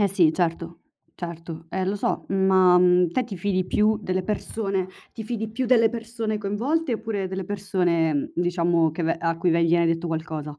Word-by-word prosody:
Eh 205 Hz, -, +3 dB
sì, 180 Hz, -5 st, +3 dB
certo, 170 Hz, -1 st, -2 dB, 0.4 s
certo. 165 Hz, -1 st, -7 dB
Eh, 185 Hz, +2 st, -2 dB
lo 195 Hz, +2 st, -1 dB
so, -, -, -2 dB
ma, 190 Hz, -2 st, +4 dB
mhmm, 180 Hz, -1 st, +4 dB
te 255 Hz, +8 st, 0 dB
ti 210 Hz, -4 st, -7 dB
fidi 185 Hz, 0 st, -1 dB
più 215 Hz, +3 st, +2 dB
delle 185 Hz, -2 st, -2 dB
persone 195 Hz, -1 st, -2 dB, 0.2 s
ti 225 Hz, -, -7 dB
fidi 220 Hz, -1 st, -4 dB
più 255 Hz, +4 st, -2 dB
delle 230 Hz, -2 st, +5 dB
persone 225 Hz, -2 st, -4 dB
coinvolte, 245 Hz, +10 st, -1 dB
oppure 215 Hz, -3 st, -3 dB
delle 190 Hz, 0 st, -4 dB
persone, 175 Hz, -6 st, 0 dB
diciamo, 170 Hz, -2 st, +1 dB
che 160 Hz, +3 st, -5 dB
ve 165 Hz, 0 st, +1 dB
a 165 Hz, 0 st, -1 dB
cui 170 Hz, +1 st, +1 dB
viene 170 Hz, +1 st, +3 dB
detto 165 Hz, +1 st, 0 dB
qualcosa? 155 Hz, -2 st, -4 dB
185 Hz, 180 wpm, -24 LUFS, 170-210 Hz, 0.4 s, delle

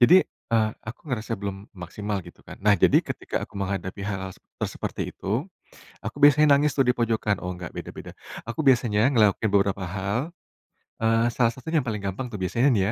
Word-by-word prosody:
Jadi, 145 Hz, +9 st, +8 dB
eee, 110 Hz, -2 st, -1 dB, 0.2 s
aku 115 Hz, -, -7 dB
ngerasa 115 Hz, -3 st, -3 dB
belum 100 Hz, +1 st, -6 dB
maksimal 100 Hz, +3 st, -4 dB
gitu -, -, -14 dB
kan. -, -, -9 dB
Nah 105 Hz, -1 st, +6 dB
jadi -, -, +5 dB
ketika -, -, -4 dB
aku 100 Hz, -, -14 dB
menghadapi 95 Hz, 0 st, -3 dB
hal-hal 95 Hz, -2 st, -3 dB, 0.3 s
te -, -, +1 dB
seperti -, -, -4 dB
itu, 110 Hz, +9 st, -2 dB, 0.6 s
aku -, -, -5 dB
biasanya 145 Hz, +1 st, +7 dB
nangis 145 Hz, +1 st, +2 dB
tuh 135 Hz, -, +4 dB
dipojokan, 115 Hz, -4 st, +1 dB
oh 90 Hz, -, -2 dB
nggak 90 Hz, -1 st, -7 dB
beda-beda. -, -, -7 dB, 0.4 s
Aku 115 Hz, -, -6 dB
biasanya 115 Hz, -3 st, +4 dB
ngelakuin 110 Hz, -3 st, +3 dB
beberapa 100 Hz, -1 st, +2 dB
hal, 100 Hz, +4 st, -1 dB, 0.8 s
eee, 115 Hz, +1 st, +3 dB
salah 115 Hz, -2 st, +3 dB
satu 130 Hz, -, -14 dB
yang 155 Hz, -, +4 dB
paling 105 Hz, -3 st, -3 dB
gampang 100 Hz, +6 st, -3 dB
tuh 105 Hz, -, -6 dB
biasanya 115 Hz, +8 st, +1 dB
nih 100 Hz, -, +2 dB
110 Hz, 180 wpm, -25 LUFS, 100-120 Hz, 0.8 s, Jadi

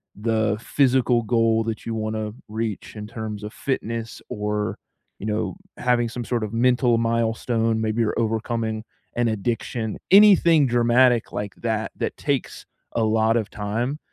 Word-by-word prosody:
the 110 Hz, 0 st, 0 dB
physical 125 Hz, -2 st, +2 dB
goal 115 Hz, 0 st, +2 dB
that 110 Hz, -1 st, -4 dB
you 115 Hz, -, -3 dB
wanna 110 Hz, -1 st, -2 dB, 0.2 s
reach 110 Hz, -2 st, -4 dB
in 105 Hz, -, -6 dB
terms 105 Hz, -1 st, -6 dB
of 105 Hz, -, -6 dB
fitness, 115 Hz, -4 st, -3 dB
or, 105 Hz, -1 st, -2 dB, 0.4 s
you 105 Hz, -, -5 dB
know, 105 Hz, +8 st, -1 dB, 0.2 s
having 120 Hz, -1 st, +1 dB
some 120 Hz, +1 st, -5 dB
sort 120 Hz, -2 st, -1 dB
of 105 Hz, +1 st, -4 dB
mental 120 Hz, 0 st, +3 dB
milestone. 115 Hz, 0 st, 0 dB
Maybe 110 Hz, +1 st, 0 dB
you're 110 Hz, -, 0 dB
overcoming 110 Hz, 0 st, -1 dB, 0.3 s
an 120 Hz, 0 st, +2 dB
addiction. 110 Hz, +1 st, -2 dB
Anything 185 Hz, -7 st, +7 dB
dramatic 120 Hz, 0 st, +3 dB
like 105 Hz, -1 st, -4 dB
that 110 Hz, -2 st, -2 dB
that -, -, -3 dB
takes 140 Hz, -3 st, -2 dB, 0.3 s
a 115 Hz, -, +1 dB
lot 110 Hz, +1 st, +3 dB
of 110 Hz, -, -2 dB
time 115 Hz, +8 st, -2 dB
115 Hz, 150 wpm, -23 LUFS, 110-120 Hz, 0.4 s, Anything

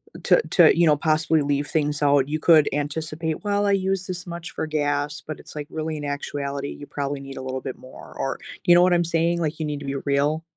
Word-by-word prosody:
uh, -, -, -8 dB
to -, -, +5 dB
to -, -, +6 dB
you 170 Hz, -, +5 dB
know, 150 Hz, -2 st, +5 dB
possibly 155 Hz, +1 st, +2 dB
leave 145 Hz, 0 st, 0 dB
things 150 Hz, -2 st, -1 dB
out, 140 Hz, -2 st, +4 dB
you 155 Hz, +1 st, -1 dB
could 155 Hz, -2 st, +5 dB
anticipate, 155 Hz, +3 st, -3 dB
"Well, 205 Hz, 0 st, +1 dB
I 200 Hz, -, +2 dB
use 190 Hz, -1 st, 0 dB
this 180 Hz, -1 st, -6 dB
much 170 Hz, -1 st, -7 dB
for -, -, -3 dB
gas," 145 Hz, 0 st, -1 dB
but 155 Hz, -, -6 dB
it's, -, -, -13 dB
like, 150 Hz, -1 st, -5 dB
really, 155 Hz, 0 st, -4 dB
in 145 Hz, -, -5 dB
actuality, 140 Hz, 0 st, -4 dB
you 145 Hz, -, -8 dB
probably 140 Hz, 0 st, -3 dB
need 135 Hz, 0 st, -9 dB
a -, -, -5 dB
little 130 Hz, 0 st, -4 dB
bit 130 Hz, -, -6 dB
more, 130 Hz, -, -13 dB
or 135 Hz, -, -2 dB, 0.3 s
you 175 Hz, -, +7 dB
know 175 Hz, -, +7 dB
what 180 Hz, 0 st, +4 dB
I'm 175 Hz, 0 st, +3 dB
saying? 170 Hz, +1 st, +1 dB
Like, 155 Hz, 0 st, -2 dB
you 155 Hz, -, -1 dB
need 150 Hz, -1 st, -3 dB
to 145 Hz, -, -8 dB
be 135 Hz, 0 st, -3 dB
real. 145 Hz, +3 st, +1 dB
150 Hz, 250 wpm, -23 LUFS, 145-165 Hz, 0.3 s, you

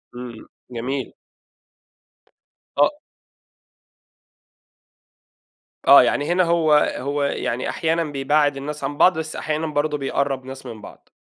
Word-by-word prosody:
إمم 120 Hz, -2 st, -9 dB, 0.2 s
جميل. 125 Hz, +3 st, -4 dB, 1.6 s
آه -, -, +2 dB, 2.9 s
آه -, -, +9 dB
يعني 145 Hz, -, 0 dB
هنا 185 Hz, +1 st, +3 dB
هو 165 Hz, -2 st, +2 dB, 0.2 s
هو 140 Hz, +2 st, -2 dB
يعني 130 Hz, -3 st, -2 dB
أحيانًا 165 Hz, +1 st, 0 dB
بيبعد 145 Hz, 0 st, +1 dB
الناس 150 Hz, +2 st, -6 dB
عن 145 Hz, -, -3 dB
بعض 180 Hz, +1 st, +5 dB
بس 155 Hz, -1 st, -5 dB
أحيانًا 155 Hz, +1 st, -2 dB
برضه 150 Hz, 0 st, -1 dB
بيقرب 135 Hz, -1 st, -2 dB
ناس 135 Hz, 0 st, -9 dB
من 115 Hz, -4 st, -9 dB
بعض. -, -, -14 dB
145 Hz, 110 wpm, -22 LUFS, 135-155 Hz, 2.9 s, آه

